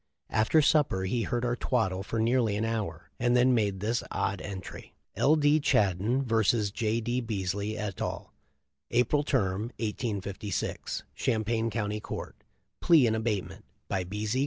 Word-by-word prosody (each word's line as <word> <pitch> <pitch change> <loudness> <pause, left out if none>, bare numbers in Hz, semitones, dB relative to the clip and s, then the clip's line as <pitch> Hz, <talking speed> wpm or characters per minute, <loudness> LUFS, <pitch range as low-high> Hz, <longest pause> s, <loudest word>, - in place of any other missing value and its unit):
After 130 +8 +3
supper 140 -11 +3
he 115 +6 0
heard 120 +3 -1
our 120 0 +1
twaddle 95 -7 0
for 110 +3 -4
nearly 115 -2 +2
an 110 +2 0
hour, 105 -8 -3
and 120 +1 +3
then 125 +1 +5
made 100 -5 +1
this 115 +3 0
odd 95 -1 -1
entry: 95 -2 -8 0.2
'L. 150 +3 +4
D. 150 0 +4
Chaddon 105 - +2
vs. 110 -3 +2
J. 110 +1 0
D. 120 +3 -1
Beasley 100 -1 -2
et 105 -3 -4
al. - - -4 0.6
April 125 +5 +2
Term, 100 -10 0 0.2
1856. 105 -4 -3
Champaign 115 -2 0
County 105 -1 -2
Court. - - -6 0.4
Plea 160 -7 +6
in 110 - +2
abatement 110 -3 -2 0.2
by 95 - -1
B. 105 +4 -4
Z. 115 +5 0
110 Hz, 155 wpm, -29 LUFS, 100-120 Hz, 0.6 s, Plea